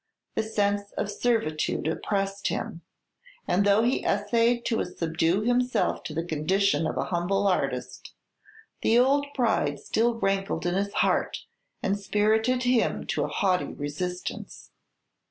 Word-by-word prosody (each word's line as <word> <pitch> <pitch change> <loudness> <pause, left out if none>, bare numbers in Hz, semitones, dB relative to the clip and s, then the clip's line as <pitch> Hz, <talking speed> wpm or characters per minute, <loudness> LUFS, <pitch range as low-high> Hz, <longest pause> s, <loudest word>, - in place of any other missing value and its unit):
The - - +1
sense 205 -2 -1
of 205 - -2
servitude 200 -11 0
oppressed 195 +4 -1
him; 170 - -3 0.7
and 185 +3 +2
though 205 +2 +4
he 245 +3 +1
essayed 230 +4 +1
to 225 - +1
subdue 165 +2 0
himself 245 +2 +1
to 155 - -5
the 165 +1 -2
condition 165 +1 +1
of - - -4
an - - 0
humble 190 +3 0
artist, 130 -8 -2 0.7
the 230 - +3
old 280 +3 +3
pride 220 - +1
still 230 +1 +1
rankled 195 -4 -1
in 175 - +1
his 200 +2 -1
heart, - - 0 0.4
and 200 +1 0
spirited 220 +5 +1
him 245 -2 +1
to - - 0
a - - -3
haughty 185 -2 0
resistance. 180 +5 -5
200 Hz, 135 wpm, -27 LUFS, 175-225 Hz, 0.7 s, though